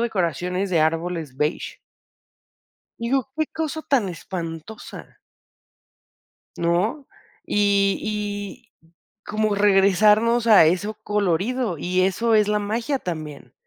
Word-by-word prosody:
decoraciones 185 Hz, -, -1 dB
de 170 Hz, -, +2 dB
árboles 160 Hz, -3 st, -1 dB
beige 150 Hz, +3 st, -2 dB, 1.2 s
digo: 255 Hz, +3 st, -1 dB
"¡Qué 315 Hz, -1 st, 0 dB
cosa 315 Hz, -1 st, -4 dB
tan 240 Hz, -9 st, +1 dB
espantosa!". 170 Hz, +2 st, -8 dB, 1.4 s
¿No? 195 Hz, -, 0 dB, 0.4 s
Y 200 Hz, -1 st, +2 dB
y 205 Hz, -2 st, -5 dB, 0.5 s
como 215 Hz, 0 st, 0 dB
regresarnos 210 Hz, +4 st, +4 dB
a 210 Hz, -7 st, +7 dB
eso 185 Hz, +6 st, 0 dB
colorido, 210 Hz, +1 st, -1 dB
y 185 Hz, +4 st, 0 dB
eso 220 Hz, +5 st, +1 dB
es 210 Hz, -1 st, +4 dB
la 210 Hz, 0 st, +2 dB
magia 230 Hz, +7 st, -2 dB
también. 155 Hz, -, -7 dB
205 Hz, 100 wpm, -23 LUFS, 175-220 Hz, 1.4 s, a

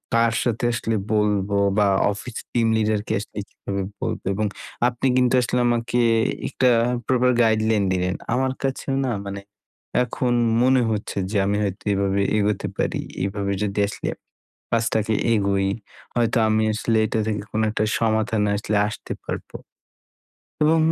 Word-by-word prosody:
কার 115 Hz, 0 st, +3 dB
সাথে 120 Hz, -1 st, -1 dB
আসলে 115 Hz, -2 st, -1 dB, 0.2 s
বলবো? 105 Hz, -2 st, +1 dB, 0.2 s
বা 105 Hz, -1 st, +4 dB, 0.2 s
অফিস 115 Hz, +3 st, -7 dB
টিম 115 Hz, -2 st, +2 dB
লিডারকে 110 Hz, 0 st, 0 dB
আসলে 105 Hz, -, -10 dB
কীভাবে 100 Hz, 0 st, -5 dB, 0.2 s
বলবো -, -, -3 dB
এবং 105 Hz, +2 st, -1 dB, 0.4 s
আপনি 125 Hz, +2 st, -1 dB
কিন্তু 125 Hz, -1 st, +3 dB
আসলে 125 Hz, 0 st, 0 dB
আমাকে 120 Hz, 0 st, 0 dB, 0.5 s
একটা 130 Hz, -, +2 dB, 0.4 s
প্রপার 125 Hz, -1 st, +3 dB
গাইডলাইন 110 Hz, -2 st, +3 dB
দিলেন। 90 Hz, 0 st, 0 dB, 0.2 s
আমার 130 Hz, +1 st, +1 dB
কাছেও 135 Hz, 0 st, -2 dB
না 125 Hz, -, 0 dB
মানে 100 Hz, 0 st, -5 dB, 0.6 s
এখন 125 Hz, 0 st, -1 dB, 0.3 s
মনে 130 Hz, 0 st, +4 dB
হচ্ছে 105 Hz, -2 st, -3 dB
যে 105 Hz, -, 0 dB
আমি 100 Hz, +1 st, +1 dB
হয়তো 100 Hz, -2 st, -3 dB
এভাবে 100 Hz, 0 st, +1 dB, 0.2 s
এগোতে 105 Hz, -1 st, 0 dB
পারি। -, -, -1 dB, 0.2 s
এভাবে 100 Hz, 0 st, -2 dB
যদি 105 Hz, 0 st, -2 dB
আসলে 105 Hz, -, -4 dB, 0.6 s
কাজটাকে 110 Hz, -1 st, +1 dB, 0.2 s
এগোই, 100 Hz, -2 st, +1 dB, 0.5 s
হয়তো 120 Hz, 0 st, +2 dB
আমি 110 Hz, 0 st, +2 dB
আসলে 115 Hz, +1 st, 0 dB
এটা 110 Hz, -, -1 dB
থেকে 105 Hz, -2 st, -2 dB
কোন 110 Hz, -, 0 dB
একটা 110 Hz, -, 0 dB, 0.2 s
সমাধানে 110 Hz, -2 st, +1 dB
আসলে 105 Hz, +1 st, -1 dB
আসতে 105 Hz, -, -6 dB
পারবো। -, -, -6 dB, 1.1 s
এবং 160 Hz, +2 st, +4 dB
110 Hz, 145 wpm, -23 LUFS, 100-120 Hz, 1.1 s, বা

